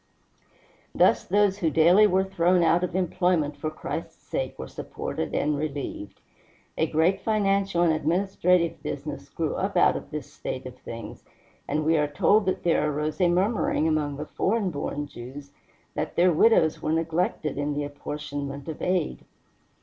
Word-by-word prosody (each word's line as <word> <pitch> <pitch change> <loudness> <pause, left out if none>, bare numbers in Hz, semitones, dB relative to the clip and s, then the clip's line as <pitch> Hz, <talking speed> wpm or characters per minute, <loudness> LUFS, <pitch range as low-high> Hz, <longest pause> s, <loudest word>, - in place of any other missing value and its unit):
Thus - - +4
those 205 -1 +2
who 165 -5 +2
daily 175 +7 +6
were 190 -1 +2
thrown 180 -2 +2
out 170 +2 +3
of 180 -1 -2
employment 180 -4 +1
for 155 +2 -3
Christ's 155 - -6
sake - - -3
were - - -6
supported 80 -3 -5
and 150 0 +1
relieved. 140 -8 -5 0.5
A 160 - +1
great 160 +5 +2
financial 195 -4 +1
and 165 -2 +4
administrative 170 +1 +1
business - - -6
grew - - -2
up - - -2
out - - +5
of - - -6
this - - -7
state 130 - -5
of 130 -1 -8
things, 115 -2 -8 0.4
and 150 +2 -1
we 160 +1 +3
are 150 - +2
told 200 +8 +3
that 185 - -1
there 160 -3 +2
arose 150 +4 -2
a 175 - +5
murmuring 185 -3 +1
among 150 -3 0
the 150 - -5
foreign 200 +3 0
born 145 -1 -3
Jews 140 +2 -10 0.4
that - - -3
their 175 0 +4
widows 160 -3 +4
were 155 - -1
neglected 165 -1 -1
in 145 0 -1
the 145 - -1
apportionment 145 -1 -6
of 160 - -6
aid. 180 -3 -1
160 Hz, 165 wpm, -26 LUFS, 145-185 Hz, 0.5 s, daily